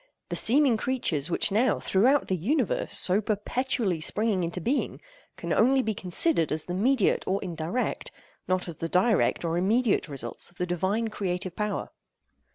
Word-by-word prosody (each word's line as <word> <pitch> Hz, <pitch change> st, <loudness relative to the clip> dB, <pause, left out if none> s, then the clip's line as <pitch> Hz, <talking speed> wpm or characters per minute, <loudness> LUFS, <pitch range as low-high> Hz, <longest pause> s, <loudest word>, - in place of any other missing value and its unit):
The -, -, -3 dB
seeming 255 Hz, 0 st, +3 dB
creatures 185 Hz, -, -1 dB
which 180 Hz, -, +1 dB
are -, -, -3 dB
now, 240 Hz, +5 st, +2 dB
throughout 255 Hz, +9 st, +2 dB
the 190 Hz, -, 0 dB
universe, 305 Hz, -, 0 dB
so 190 Hz, +3 st, +4 dB
perpetually 215 Hz, -3 st, -1 dB
springing 205 Hz, +1 st, +1 dB
into 170 Hz, +2 st, -3 dB
being, 250 Hz, -, -2 dB, 0.4 s
can -, -, -3 dB
only 265 Hz, +3 st, +3 dB
be 220 Hz, -, -1 dB
considered 185 Hz, -, +2 dB
as 155 Hz, 0 st, -1 dB
the 175 Hz, -, -5 dB
mediate 225 Hz, +3 st, +1 dB
or 195 Hz, +1 st, 0 dB
indirect, 175 Hz, +6 st, -3 dB, 0.4 s
not 185 Hz, 0 st, 0 dB
as 165 Hz, -3 st, -6 dB
the 165 Hz, -, -4 dB
direct 190 Hz, 0 st, +2 dB
or 165 Hz, +1 st, 0 dB
immediate 215 Hz, +2 st, +1 dB
results 135 Hz, -4 st, -5 dB
of 175 Hz, -, -25 dB
the 180 Hz, -, -1 dB
Divine 190 Hz, +6 st, -1 dB
creative 180 Hz, -3 st, -4 dB
power. 210 Hz, -1 st, -3 dB
195 Hz, 165 wpm, -26 LUFS, 175-240 Hz, 0.4 s, so